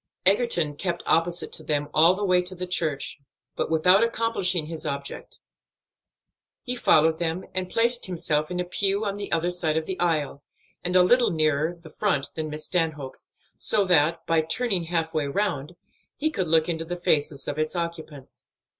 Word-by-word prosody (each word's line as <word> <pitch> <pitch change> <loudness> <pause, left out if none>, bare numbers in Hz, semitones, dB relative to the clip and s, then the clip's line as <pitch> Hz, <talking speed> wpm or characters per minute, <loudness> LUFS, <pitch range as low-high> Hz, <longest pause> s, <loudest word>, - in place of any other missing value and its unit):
Egerton 190 -7 +3
kept 170 +2 -3
opposite 170 +1 +1
to - - -3
them 145 -1 -1
all 165 +4 +5
the 205 +1 -2
way 180 -1 +4
to 180 +1 -7
the 180 0 -4
church, 160 -6 -2 0.4
but - - -2
without 180 +6 +4
accomplishing 225 -7 0
his 160 0 -6
object. 140 0 -6 1.3
He 250 -1 -2
followed 160 -8 +3
them 170 +1 -2
in - - -16
and 185 -1 -2
placed 235 +2 +1
himself 155 -4 -1
in 180 0 -3
a 180 - -1
pew 195 +3 0
on 200 - -1
the 200 0 -6
other 170 +2 +1
side 160 -3 0
of 160 - -1
the 190 +1 -5
aisle, 155 -5 0 0.4
and 180 +1 -2
a 180 - +7
little 245 +6 +4
nearer 155 -1 +1
the 165 -2 -14
front 165 -7 -1
than 155 -1 -4
Miss 150 0 -5
Stanhope's, 155 -7 -2 0.3
so 205 -2 +2
that, 165 -2 +2
by 165 -1 +2
turning 185 +2 -1
half 165 -1 -1
way 155 -3 0
round, 155 -2 -2 0.4
he 310 +2 -1
could 185 - -2
look 160 0 +3
into 165 -2 -2
the 175 +2 -5
faces 145 -4 0
of 145 +1 -3
its 155 +3 -1
occupants. 165 -5 -6
170 Hz, 185 wpm, -25 LUFS, 155-185 Hz, 1.3 s, a